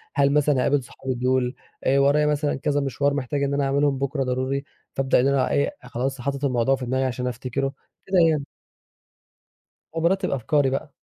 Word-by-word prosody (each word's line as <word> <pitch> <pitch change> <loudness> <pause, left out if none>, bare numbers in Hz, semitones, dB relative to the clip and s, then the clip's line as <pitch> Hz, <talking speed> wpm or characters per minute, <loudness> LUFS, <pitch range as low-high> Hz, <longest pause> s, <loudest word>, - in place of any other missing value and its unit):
هل 140 0 +3
مثلًا 150 -2 +3
هاقابل 135 +2 +2
صحابي 130 +2 -5
دُول؟ 125 +1 0 0.3
آآ 135 +1 +3
ورايا 145 +2 +4
مثلًا 150 0 +1
كذا 145 +1 0
مِشوَار 140 +1 0
محتاج 140 0 -2
إن 140 0 0
أنا 140 0 +1
أعملهم 140 0 +1
بكرة 140 0 -1
ضروري، 130 +2 -1 0.3
فابدأ 135 -1 +2
إن 130 - +3
أنا 140 -1 +2
إيه 145 - +1
خلاص 130 +2 -3
حاطط 140 +2 -2
الموضوع 130 0 +2
في 130 - -6
دماغي 130 +2 0
عشان 125 0 -2
أفتِكرُه، 130 +2 -3 0.3
كده 190 -1 +1
يعني. 150 -3 0 1.5
وبارتب 180 +4 +1
أفكاري 140 +1 +1
بقى. 135 +2 -3
135 Hz, 175 wpm, -24 LUFS, 130-145 Hz, 1.5 s, ورايا